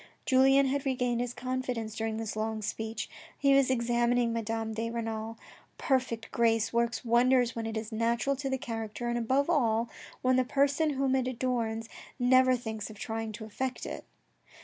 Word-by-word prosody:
Julien 270 +1 +5
had 275 +1 0
regained 250 -3 0
his 245 0 -3
confidence 250 -4 -3
during 220 0 -2
this 220 -1 -4
long 215 0 -2
speech. 220 +1 -3 0.3
He 275 -1 +4
was 275 -1 +4
examining 240 -1 +2
Madame 225 -1 -2
de 225 +1 -2
Renal. 225 -1 -4 0.4
Perfect 255 -5 -1
grace 225 -1 +2
works 235 +1 0
wonders 245 +1 +3
when 225 -1 -3
it 225 0 -3
is 220 0 -5
natural 230 +4 +1
to 270 0 -3
the 265 - 0
character, 225 -1 -4
and 240 - 0
above 260 +5 +1
all, 235 -8 +2 0.3
when 255 0 +4
the 255 - +4
person 280 +4 +2
whom 265 0 +1
it 260 -1 +1
adorns 230 -3 -1 0.3
never 255 0 +5
thinks 220 -3 -5
of 215 - -11
trying 225 +1 -4
to 220 +1 -7
affect 255 +4 -4
it. - - -6
235 Hz, 170 wpm, -30 LUFS, 225-255 Hz, 0.4 s, Julien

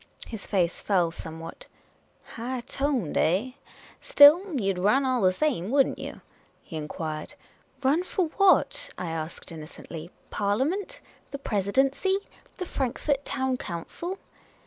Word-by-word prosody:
His 220 -3 -7
face 180 -4 +1
fell 180 -5 +2
some 160 -1 -8
what. 165 - -9 0.3
" - - -38
High 245 +2 -3
toned, 260 - -1
eh? 195 +10 +2 0.5
Still, 305 +2 +7
you 195 -2 +1
'd 180 - -6
run 215 +9 +3
all 255 -2 +1
the 185 - +5
same, 205 - 0
would 270 +1 +5
n't - - -7
you? - - -7 0.2
" - - -36
he - - -9
inquired. 155 0 -5 0.5
"Run 290 +7 +3
for 370 0 0
what?" 390 +3 +3
I 175 -2 -3
asked, 160 +2 -5
innocently. 160 +1 -9 0.2
"Parliament? 290 - -1 0.3
The 280 - -5
Presidency? 270 - +1 0.4
The 365 - -3
Frankfort 275 -1 -1
Town 260 -1 -1
Council 280 - -5
240 Hz, 145 wpm, -27 LUFS, 175-285 Hz, 0.5 s, Still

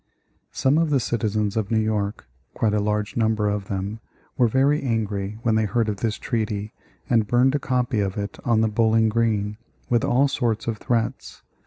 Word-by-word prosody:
Some 140 +4 +2
of 165 -1 +1
the 140 -2 +3
citizens 110 -3 -1
of 110 -3 -1
New 115 - +1
York, 105 -3 -1 0.3
quite 110 -2 +1
a 105 - +2
large 105 0 -1
number 110 -2 +1
of 100 -1 -2
them, 100 +3 -3 0.4
were 120 - +4
very 135 +5 +2
angry 105 -4 -2
when 115 - +2
they 110 0 +2
heard 110 +2 0
of 105 - -2
this 110 +1 -1
treaty 105 -2 -3 0.3
and 115 -4 +2
burned 125 +3 +3
a 145 - +1
copy 125 -4 0
of 100 -1 -1
it 100 0 -4
on 115 -2 +2
the 110 - +3
Bowling 110 0 +3
Green, 105 -2 0 0.3
with 120 -2 +3
all 135 +4 +3
sorts 120 -5 -1
of 115 -2 -3
threats. 115 -3 -2
110 Hz, 190 wpm, -23 LUFS, 105-120 Hz, 0.4 s, were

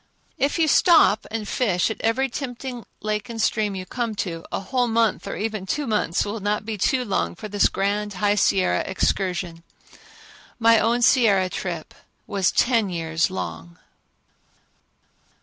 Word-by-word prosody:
If 280 +5 +1
you 325 -2 +3
stop 310 - +5
and 220 -2 -4
fish 200 -5 +1
at - - -7
every 245 +4 +1
tempting 245 -2 -6 0.2
lake 210 +2 -2
and 230 -1 -6
stream 215 -2 0
you 185 -1 -5
come 230 +2 -3
to, 165 -4 -4
a - - -2
whole 245 +5 0
month, 225 -2 +1
or - - -4
even 215 -2 -4
two 295 +6 -1
months, 210 -7 0
will 210 +2 -4
not 210 +1 -1
be 220 0 -3
too 250 +6 +1
long 195 -4 -1
for 215 - -7
this 205 -1 +2
grand 205 +1 -1
High 205 +2 +2
Sierra 190 - +2
excursion. 180 -3 -1 1.0
My 230 -1 +5
own 235 +3 +1
Sierra 205 -8 +4
trip 170 -4 -5 0.3
was 195 -2 +1
ten 230 -5 +2
years 165 -1 -1
long. 85 - -6
210 Hz, 155 wpm, -23 LUFS, 190-230 Hz, 1.0 s, stop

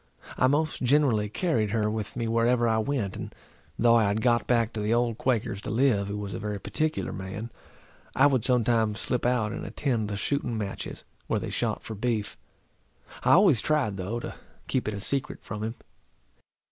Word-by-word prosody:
I 130 - +3
most 155 +3 0
generally 125 -5 +3
carried 115 - 0
her 105 0 +1
with 105 -1 -3
me 115 -2 -2
whereever 115 +1 +2
I 110 -1 +2
went, 110 -5 -1
and - - -7 0.4
though 120 0 +5
I 115 -2 +5
had 100 +2 +1
got 120 0 +2
back 115 -2 +2
to 110 - -3
the 105 +1 0
old 120 -1 0
Quaker's 110 -6 0
to - - -6
live, 110 -3 +2
who 100 +1 -4
was 100 -1 -5
a - - -4
very 105 -1 -3
particular 155 +9 -2
man, 95 +5 -6 0.6
I - - +5
would 130 -5 +3
sometimes 115 -4 +2
slip 125 -1 0
out 120 -4 +1
and - - -5
attend 120 -7 -1
the 100 -1 -3
shooting 120 0 -1
matches, 100 -3 -5 0.2
where - - +1
they - - -5
shot - - -1
for 110 - -6
beef; 110 -1 -2 0.9
I - - +4
always 175 - +6
tried, 140 -10 +1
though, 100 +6 -3
to - - -6 0.3
keep 130 - -1
it 110 - -1
a - - -5
secret 135 +6 -2
from 105 -1 -6
him. 110 +2 -3
115 Hz, 195 wpm, -27 LUFS, 105-125 Hz, 0.9 s, always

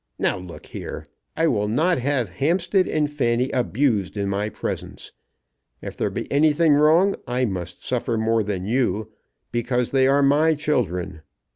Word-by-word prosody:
Now - - +1
look 90 -2 -11
here. - - -7 0.3
I 165 - +2
will 105 -9 +1
not 155 +9 +1
have 130 -4 0
Hampstead 180 +5 +2
and 150 -1 +1
Fanny 125 -3 0
abused 120 -6 0
in 100 -1 -1
my 100 +2 -1
presence. - - -6 0.7
If - - -8
there - - -1
be - - -4
anything 150 +2 +4
wrong 160 +7 +4
I 125 +1 0
must 90 -5 -5
suffer 120 -2 -1
more 110 +1 +1
than 100 -3 -3
you, 110 -2 0 0.4
because 120 +1 -1
they 130 -1 +3
are 140 +1 +3
my 150 +3 +4
children. 95 - -2
125 Hz, 155 wpm, -23 LUFS, 105-150 Hz, 0.7 s, anything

